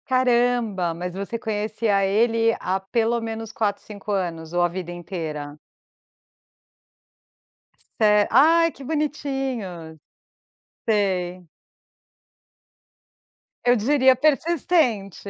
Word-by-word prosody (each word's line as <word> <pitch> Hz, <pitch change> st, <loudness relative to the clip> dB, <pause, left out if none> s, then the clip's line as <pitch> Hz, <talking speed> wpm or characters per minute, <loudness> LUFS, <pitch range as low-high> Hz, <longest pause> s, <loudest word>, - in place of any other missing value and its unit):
Caramba, 240 Hz, -8 st, +1 dB
mas 175 Hz, +2 st, -5 dB
você 200 Hz, +5 st, -4 dB
conhecia 215 Hz, -1 st, 0 dB
ele 225 Hz, +3 st, +2 dB
há 185 Hz, +1 st, -1 dB
pelo 230 Hz, +4 st, 0 dB
menos 225 Hz, -1 st, -5 dB
4, 205 Hz, -3 st, -1 dB
5 210 Hz, -1 st, -8 dB
anos, 170 Hz, -5 st, -3 dB
ou 175 Hz, 0 st, 0 dB
a 175 Hz, -, +4 dB
vida 175 Hz, 0 st, -6 dB
inteira? 160 Hz, -5 st, -6 dB, 2.4 s
Ce 210 Hz, -1 st, +4 dB
ai, 330 Hz, +4 st, +5 dB
que 275 Hz, -, -13 dB
bonitinhos. 270 Hz, -, -3 dB, 0.9 s
Sei. 185 Hz, -4 st, 0 dB, 2.2 s
Eu 245 Hz, 0 st, +5 dB
diria 260 Hz, +3 st, +4 dB
persistente. 275 Hz, -, +1 dB
215 Hz, 90 wpm, -23 LUFS, 185-245 Hz, 2.4 s, ai